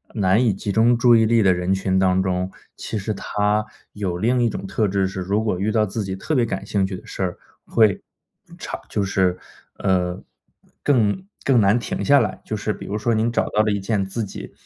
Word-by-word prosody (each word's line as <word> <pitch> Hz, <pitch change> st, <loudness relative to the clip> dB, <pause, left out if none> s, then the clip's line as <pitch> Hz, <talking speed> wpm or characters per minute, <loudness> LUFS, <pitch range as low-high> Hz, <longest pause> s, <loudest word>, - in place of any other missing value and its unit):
难 100 Hz, +3 st, +3 dB
以 110 Hz, -5 st, +3 dB
集 100 Hz, +1 st, -4 dB
中 115 Hz, +3 st, +4 dB
注 120 Hz, 0 st, +5 dB
意 110 Hz, -, +4 dB
力 115 Hz, +1 st, +3 dB
的 95 Hz, -1 st, +5 dB
人 90 Hz, +1 st, -2 dB
群 95 Hz, 0 st, +1 dB
当 95 Hz, 0 st, +3 dB
中， 90 Hz, 0 st, -1 dB, 0.2 s
其 110 Hz, -, -5 dB
实 105 Hz, +2 st, -2 dB
他 105 Hz, +1 st, 0 dB, 0.3 s
有 95 Hz, -4 st, -3 dB
另 120 Hz, +6 st, +1 dB
一 120 Hz, -, +3 dB
种 100 Hz, -, -5 dB
特 105 Hz, +2 st, 0 dB
质 95 Hz, 0 st, +1 dB
是 95 Hz, 0 st, -6 dB
如 100 Hz, +4 st, 0 dB
果 100 Hz, -5 st, -1 dB
遇 105 Hz, +2 st, 0 dB
到 110 Hz, -1 st, +2 dB
自 105 Hz, +2 st, -3 dB
己 95 Hz, -1 st, -4 dB
特 125 Hz, +11 st, -4 dB
别 125 Hz, -3 st, +3 dB
感 100 Hz, -3 st, -4 dB
兴 100 Hz, -2 st, 0 dB
趣 95 Hz, 0 st, -4 dB
的 -, -, -14 dB
事 -, -, -7 dB
儿， 90 Hz, -2 st, -2 dB, 0.3 s
会 110 Hz, -4 st, +3 dB, 0.6 s
长 -, -, -6 dB
就 100 Hz, -, -1 dB
是， 95 Hz, -2 st, +1 dB, 0.4 s
呃， 90 Hz, -2 st, 0 dB, 0.6 s
更 130 Hz, -, +1 dB, 0.2 s
更 130 Hz, -4 st, +4 dB
难 100 Hz, +3 st, +4 dB
停 185 Hz, +10 st, -4 dB
下 140 Hz, -1 st, +5 dB
来。 105 Hz, -6 st, -2 dB
就 110 Hz, -, -4 dB
是 105 Hz, +1 st, -2 dB
比 -, -, -9 dB
如 105 Hz, -, -2 dB
说 115 Hz, +2 st, 0 dB
您 115 Hz, +2 st, +1 dB
找 -, -, 0 dB
到 105 Hz, -, +2 dB
了 110 Hz, -1 st, +1 dB
一 100 Hz, -, 0 dB
件 100 Hz, 0 st, 0 dB
自 95 Hz, +4 st, -3 dB
己 -, -, -8 dB
105 Hz, 245 characters per minute, -22 LUFS, 95-110 Hz, 0.6 s, 注